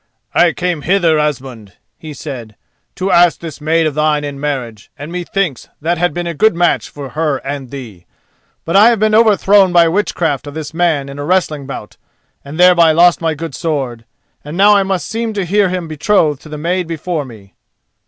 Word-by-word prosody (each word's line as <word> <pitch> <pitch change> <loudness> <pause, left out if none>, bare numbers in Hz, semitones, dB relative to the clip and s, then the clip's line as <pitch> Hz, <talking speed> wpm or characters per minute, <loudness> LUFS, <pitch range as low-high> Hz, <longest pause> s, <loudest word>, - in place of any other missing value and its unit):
"I 175 - +4
came 175 -3 -2
hither, 170 -2 +2
Asmund," 130 -9 -4 0.2
he 155 - -10
said, 125 -7 -8 0.4
"to 190 +1 -2
ask 175 -1 +4
this 160 -3 -9
maid 160 +2 +1
of 155 - -1
thine 150 0 +1
in 140 -1 -6
marriage, 125 -7 -4
and 150 +3 -8
methinks 175 -4 -3
that 165 +2 -1
had 175 -1 +1
been 175 +3 -4
a 170 - -3
good 195 +5 +2
match 175 0 +1
for 140 -2 -8
her 150 0 -1
and 135 -2 -5
thee. 115 -10 -10 0.6
But 165 - -2
I 210 +4 +7
have 235 - +2
been 215 0 +2
overthrown 205 -3 +4
by 170 -1 +5
witchcraft 165 -6 -1
of 145 - -8
this 155 -1 -6
man 160 -5 0
in 140 +1 -9
a - - -3
wrestling 155 -4 0
bout, 105 -6 -8 0.5
and 145 +4 -9
thereby 175 -2 +6
lost 175 +2 +4
my 160 -1 0
good 160 -1 -6
sword; 130 -5 -3 0.4
and 150 +4 -7
now 205 +2 +6
I 200 - +4
must 190 -2 -2
seem 225 0 -3
to 200 -3 -2
hear 200 +2 +2
him 180 -2 -3
betrothed 155 -1 +1
to 155 - -13
the 150 - -6
maid 175 +3 -2
before 165 -1 -3
me." 110 -7 -14
160 Hz, 200 wpm, -15 LUFS, 145-180 Hz, 0.6 s, I